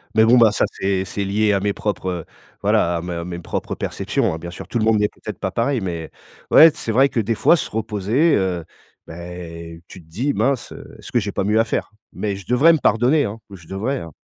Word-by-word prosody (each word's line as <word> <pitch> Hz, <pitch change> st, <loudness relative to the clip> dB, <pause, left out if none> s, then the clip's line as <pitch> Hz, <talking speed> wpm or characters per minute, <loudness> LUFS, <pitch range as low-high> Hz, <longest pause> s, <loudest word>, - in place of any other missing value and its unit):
mais 110 Hz, -, +6 dB
bon, 120 Hz, +3 st, +6 dB
bah, 115 Hz, -3 st, +6 dB
ça, -, -, +1 dB
c'est 95 Hz, -1 st, -1 dB
c'est 100 Hz, +1 st, -4 dB
lié 105 Hz, +2 st, +1 dB
à 100 Hz, -, +2 dB
mes 100 Hz, +1 st, -1 dB
propres, 100 Hz, -3 st, -3 dB
heu, 85 Hz, -3 st, -4 dB, 0.4 s
voilà, 85 Hz, 0 st, +2 dB
à -, -, -4 dB
mes, 90 Hz, +1 st, -6 dB
heu, 85 Hz, 0 st, -4 dB
mes 85 Hz, -1 st, -6 dB
propres 85 Hz, -, -4 dB
perceptions, -, -, -1 dB
hein, 80 Hz, -, -4 dB
bien 85 Hz, +2 st, -7 dB
sûr, 85 Hz, -, -9 dB
tout 120 Hz, -, -1 dB
le 110 Hz, -, +1 dB
monde 110 Hz, -1 st, +3 dB
n'est 105 Hz, 0 st, +2 dB
peut-être -, -, -9 dB
pas -, -, -2 dB
pareil, 125 Hz, +1 st, 0 dB
mais 85 Hz, -4 st, -4 dB, 0.4 s
ouais, 160 Hz, +1 st, +8 dB
c'est 115 Hz, -, -4 dB
vrai 135 Hz, +4 st, +4 dB
que, 125 Hz, -, -1 dB
des 115 Hz, +1 st, 0 dB
fois, 170 Hz, -, +4 dB
se -, -, -4 dB
reposer, 110 Hz, -, +1 dB
heu, 90 Hz, -3 st, -1 dB, 0.4 s
bah, 80 Hz, -, -10 dB, 0.7 s
tu 95 Hz, -, -11 dB
te 80 Hz, -, -23 dB
dis: 120 Hz, -, -2 dB
«Mince, 125 Hz, +4 st, 0 dB
heu, -, -, -11 dB
est-ce -, -, -11 dB
que 120 Hz, -, +3 dB
j'ai 100 Hz, -2 st, -3 dB
pas -, -, -1 dB
mieux 105 Hz, +3 st, +2 dB
à 115 Hz, -, +3 dB
faire?», 110 Hz, -, -3 dB, 0.2 s
mais 100 Hz, -2 st, -3 dB
je 100 Hz, -, -11 dB
devrais 135 Hz, +7 st, +5 dB
me 160 Hz, -, +2 dB
pardonner, 125 Hz, +7 st, +3 dB
hein, 105 Hz, +3 st, -6 dB
oh 100 Hz, -, -10 dB
je 85 Hz, -2 st, -17 dB
devrais, 110 Hz, +10 st, -2 dB
hein. 85 Hz, -, -9 dB
105 Hz, 255 wpm, -21 LUFS, 95-120 Hz, 0.7 s, ouais